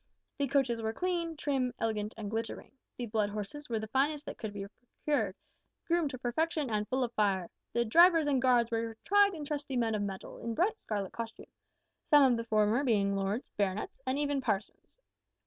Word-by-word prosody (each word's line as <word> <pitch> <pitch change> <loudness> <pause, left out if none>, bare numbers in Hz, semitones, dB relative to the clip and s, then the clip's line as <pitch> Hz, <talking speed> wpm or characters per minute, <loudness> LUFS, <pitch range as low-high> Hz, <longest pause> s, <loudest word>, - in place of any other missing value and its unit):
The 280 - +1
coaches 260 -4 +1
were 220 0 -1
clean, 340 0 -2
trim, 260 -4 -1
elegant, 215 -1 -2
and 210 -2 -5
glittering; 225 +1 -4 0.3
the 245 - -3
blood 215 -2 0
horses 215 +8 -6
were 230 - 0
the 220 - -3
finest 285 +5 +1
that - - -7
could 220 -2 -4
be 200 -1 -5
procured, 250 +7 -3 0.5
groomed 335 -3 +1
to 260 - -6
perfection, 285 +3 -1
and 210 -1 0
full 260 0 0
of 240 -1 -3
fire; 195 -5 +1 0.2
the 235 0 +2
drivers 330 +6 +6
and 275 -3 +2
guards 240 -2 +3
were 225 -1 -2
tried 405 -1 +4
and 300 -2 -6
trusty 285 -3 -3
men 230 -2 +1
of 210 - 0
mettle, 195 -2 -5
in 230 -1 -4
bright 425 - +1
scarlet 200 -3 -3
costume 230 -1 -7 0.6
some 295 -2 +8
of 255 -3 +5
the 230 - -2
former 215 +3 +2
being 200 -6 +2
lords, 195 +5 -2
baronets, 200 +5 -2
and 260 +1 +1
even 285 -1 0
parsons! 215 -5 -3
235 Hz, 195 wpm, -31 LUFS, 215-290 Hz, 0.6 s, some